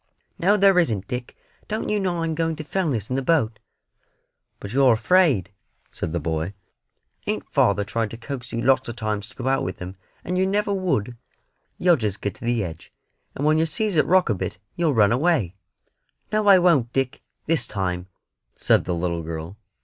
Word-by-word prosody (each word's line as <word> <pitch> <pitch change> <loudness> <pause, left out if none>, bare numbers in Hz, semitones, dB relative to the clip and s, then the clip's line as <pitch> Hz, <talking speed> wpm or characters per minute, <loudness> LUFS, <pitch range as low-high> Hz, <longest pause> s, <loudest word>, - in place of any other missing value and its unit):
"No 195 +4 +4
there 195 -2 +5
isn't, 110 - 0
Dick; 125 0 -5 0.3
don't 215 +1 -3
you 210 - +1
know 175 -4 -1
I'm 165 -1 -1
going 165 0 -1
to 155 - -6
Fellness 145 - -2
in - - +1
the 135 - 0
boat." 130 -7 +1 1.0
"But 100 +2 -7
you're 135 -2 +5
afraid," 115 - +3 0.4
said - - -4
the 85 - -1
boy; 80 +4 -3 0.7
"ain't - - -2
father 100 0 +2
tried 110 +2 -2
to 115 - -8
coax 125 0 -7
you 115 0 -2
lots 130 -2 +3
o' - - -4
times 105 -2 -3
to - - -17
go 130 - -4
out 135 0 +2
with 90 - -4
him, 90 +1 -7 0.3
and 180 +1 -1
yer 190 - +3
never 205 +1 0
would? 125 - -1 0.6
You'll 175 -2 +4
just 105 -4 -2
get 100 -2 -3
to 115 - -11
the 120 -2 +1
edge, 80 -3 -8 0.4
and 145 - -2
when 155 +1 +4
yer 160 - +3
sees 210 +4 -1
it 155 - +3
rock 185 +2 +4
a 115 - +2
bit 95 - -4 0.2
yer'll 165 -5 +1
run 105 -2 +5
away." 130 - +1 0.8
"No, 215 -1 +1
I 195 -2 +9
won't, 165 -10 +3
Dick, 135 -1 -1 0.2
this 155 -6 0
time," 90 -3 -3 0.5
said - - +3
the 90 - -1
little 85 0 -2
girl. 80 +3 -6
125 Hz, 195 wpm, -23 LUFS, 100-170 Hz, 1.0 s, I